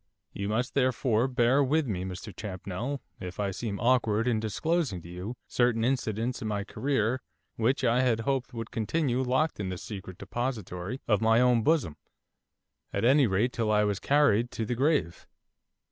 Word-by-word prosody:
You 100 0 -3
must, 120 +4 -1
therefore, 125 -3 +2
bear 130 +2 +3
with 150 +3 +2
me, 95 -7 -2
Mr 95 +1 -7
Champnell, 105 +7 -4 0.2
if 90 +1 -7
I 100 -1 0
seem 100 0 -4
awkward 115 -2 +2
in 115 -3 +2
disclosing 125 - -1
to - - -10
you 90 +8 -6
certain 120 -2 +2
incidents 120 -2 -1
in 110 - -3
my 105 -1 -1
career 130 +1 -1 0.3
which 130 +5 +1
I 120 +1 +3
had 120 -3 +2
hoped 130 +1 -1
would 115 -2 -6
continue 125 +3 0
locked 130 +4 +1
in 95 -2 -2
the 90 - -4
secret 95 -2 -8
depository 115 -2 -4
of 105 -3 +2
my 115 +1 +4
own 125 -2 +4
bosom, 135 - +1 0.9
at 100 +3 -1
any 135 +1 +5
rate 105 +6 +1
till 110 -2 0
I 105 0 +4
was 100 -2 0
carried 135 -5 +3
to 110 - -2
the 120 - -2
grave. 135 - 0
115 Hz, 175 wpm, -28 LUFS, 105-130 Hz, 0.9 s, any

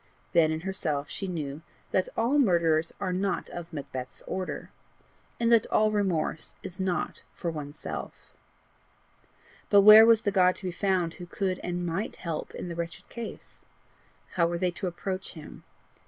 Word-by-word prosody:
Then 160 -2 +5
in 160 0 -2
herself 160 -6 -1
she 195 - -4
knew 150 -4 -4 0.3
that 185 - +1
all 245 +6 +3
murderers 170 - +3
are 185 - -1
not 190 +1 -1
of 175 -1 -7
Macbeth's 130 -4 -7
order, 185 0 -4 0.7
and 235 0 +2
that 230 -2 +5
all 215 0 +3
remorse 185 -7 -1
is 185 - -8
not 185 -2 -1
for 170 - -3
oneself. 150 -1 -7 1.4
But 200 -1 +7
where 215 +2 +11
was 225 -1 +5
the 205 - +1
God 185 -1 +4
to - - -10
be 180 - -1
found 180 -2 0
who 175 - -9
could 185 0 -2
and 175 0 -3
MIGHT 175 +6 -2
help 165 -4 -5
in - - -5
the 170 - -4
wretched 170 0 -6
case? 235 -2 -9 0.7
How 170 -2 +2
were 170 0 -2
they 180 +1 +1
to 185 +2 -4
approach 185 +2 -4
him? 155 -3 -11
180 Hz, 165 wpm, -28 LUFS, 165-195 Hz, 1.4 s, where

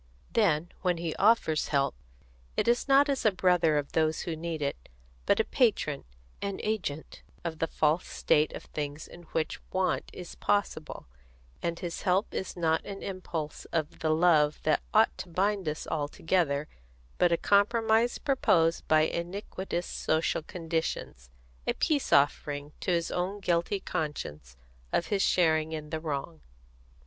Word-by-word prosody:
Then 175 -6 +2
when 180 -2 +1
he 165 -2 -3
offers 200 -8 +3
help, 140 -2 +1 0.6
it - - +1
is 240 +3 +2
not 275 +1 +6
as 275 -2 0
a 215 - +5
brother 180 -4 +3
of 145 -1 -2
those 160 -1 +1
who 170 - -3
need 165 0 -4
it, 140 - -4 0.4
but - - +4
a - - +5
patron, - - +1 0.4
an 200 -1 -3
agent 180 -9 -3 0.2
of 165 -2 -4
the 165 - +1
false 155 +2 +1
state 150 +1 +2
of - - -7
things 145 0 -5
in 175 0 -13
which 160 - -2
want 185 0 0
is 180 -2 -9
possible; 200 -6 -1 0.6
and 170 0 -2
his 175 -1 -5
help 190 +2 +1
is 190 - -4
not 160 -2 +1
an 200 -1 -7
impulse 170 -5 -5
of 155 -3 -3
the 160 - 0
love 155 -2 +4
that - - +2
ought 65 - +4
to - - -6
bind 195 0 0
us 150 - -4
all 150 -2 -1
together, 150 -2 0 0.5
but 175 - +4
a 170 - +3
compromise 225 +4 +3
proposed 170 - +2
by 155 0 +5
iniquitous 175 +2 -3
social 160 +1 0
conditions, 160 - -4 0.4
a - - +2
peace 295 -3 0
offering 145 +1 +2
to - - -4
his 170 -2 +1
own 185 +3 -2
guilty 175 +1 0
consciousness 75 - -4 0.3
of 170 - +1
his 195 - +2
share 160 -5 +4
in 155 -1 -6
the 160 - -2
wrong." 140 - -4
170 Hz, 155 wpm, -29 LUFS, 155-190 Hz, 0.6 s, not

